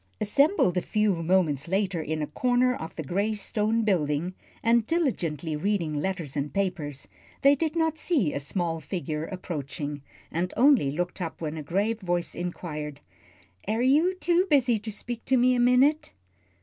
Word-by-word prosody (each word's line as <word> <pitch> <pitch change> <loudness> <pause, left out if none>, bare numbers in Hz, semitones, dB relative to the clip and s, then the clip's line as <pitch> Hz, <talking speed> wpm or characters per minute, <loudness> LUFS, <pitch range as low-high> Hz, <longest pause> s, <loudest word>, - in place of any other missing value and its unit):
Assembled 215 - +3
a - - -5
few 210 0 +1
moments 165 -5 +1
later 190 -2 0
in 155 0 -2
a - - 0
corner 250 +9 +2
of 160 -7 -7
the 160 - -4
gray 200 +8 -1
stone 215 +2 0
building, 170 -3 0 0.3
and 230 -1 +3
diligently 170 - -1
reading 170 -1 -1
letters 160 -2 -3
and 145 0 -2
papers, 180 -8 -2 0.4
they 280 +1 +7
did 310 +2 -1
not 320 -1 0
see 275 - +1
a - - -2
small 165 +3 -2
figure 160 -3 -4
approaching, 145 -5 -5 0.3
and 175 +2 -2
only 255 - +5
looked 175 +6 -3
up 165 -2 -4
when 155 -1 -4
a 155 - -5
grave 200 +9 -1
voice 175 -2 -1
inquired, 150 -4 -5 0.7
"Air 225 +3 0
you 310 +8 +4
too 360 +1 +2
busy 250 -6 +3
to 215 +1 -6
speak 235 +3 -6
to 260 - +3
me 250 +1 +4
a 250 - +1
minute?" 255 +5 +3
190 Hz, 165 wpm, -27 LUFS, 160-245 Hz, 0.7 s, they